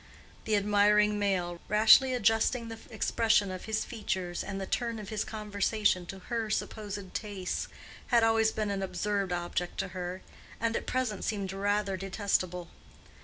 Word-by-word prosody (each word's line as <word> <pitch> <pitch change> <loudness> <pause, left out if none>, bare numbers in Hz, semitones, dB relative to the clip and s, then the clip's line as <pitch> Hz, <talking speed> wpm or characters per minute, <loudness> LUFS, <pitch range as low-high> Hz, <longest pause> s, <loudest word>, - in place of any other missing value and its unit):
The 215 - +2
admiring 210 +1 +4
male, 180 -4 -1
rashly 220 +5 +7
adjusting 230 +1 +2
the 225 0 -7
expression 220 -2 +2
of 185 -1 -6
his 220 0 -1
features 190 -6 -3
and 195 0 -5
the 195 - -3
turn 235 +3 -1
of 210 -2 -7
his 215 -1 -1
conversation 210 -3 0
to 195 - -7
her 225 +3 -3
supposed 205 -2 -4
tastes, 200 -4 -3 0.4
had 235 -2 +4
always 225 -1 +4
been 215 -2 -2
an 195 -1 -2
absurd 195 +1 -1
object 175 0 -2
to 195 - -2
her, 180 +1 -5 0.4
and 230 0 0
at - - -3
present 250 -6 -1
seemed 200 -3 -2
rather 200 0 0
detestable. 185 -2 -1
205 Hz, 155 wpm, -30 LUFS, 190-220 Hz, 0.4 s, rashly